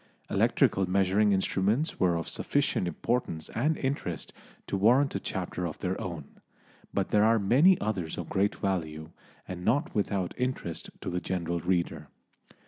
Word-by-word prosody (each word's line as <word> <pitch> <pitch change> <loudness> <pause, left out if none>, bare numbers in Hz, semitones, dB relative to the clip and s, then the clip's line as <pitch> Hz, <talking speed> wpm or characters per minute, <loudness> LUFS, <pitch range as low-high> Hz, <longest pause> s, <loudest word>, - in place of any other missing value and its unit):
Electrical 95 -1 +2
measuring 100 +2 +3
instruments 100 - +1
were 90 -2 +3
of 85 - -3
sufficient 90 - 0
importance 85 -2 -2
and 150 +7 0
interest 130 - -3 0.3
to - - -3
warrant 120 +8 +4
a 100 - -1
chapter 90 -2 -3
of 75 - -7
their - - -3
own, - - -7 0.5
but 100 -1 -1
there 105 0 +4
are 115 +1 +5
many 135 - +5
others 95 -7 -2
of - - -4
great 100 +2 +1
value, 80 -5 -3 0.4
and 90 -1 -6
not 140 - +1
without 100 -3 -1
interest 125 -10 -3
to - - -4
the 90 0 -2
general 85 -2 -2
reader. 85 -4 -1
95 Hz, 150 wpm, -29 LUFS, 90-110 Hz, 0.5 s, are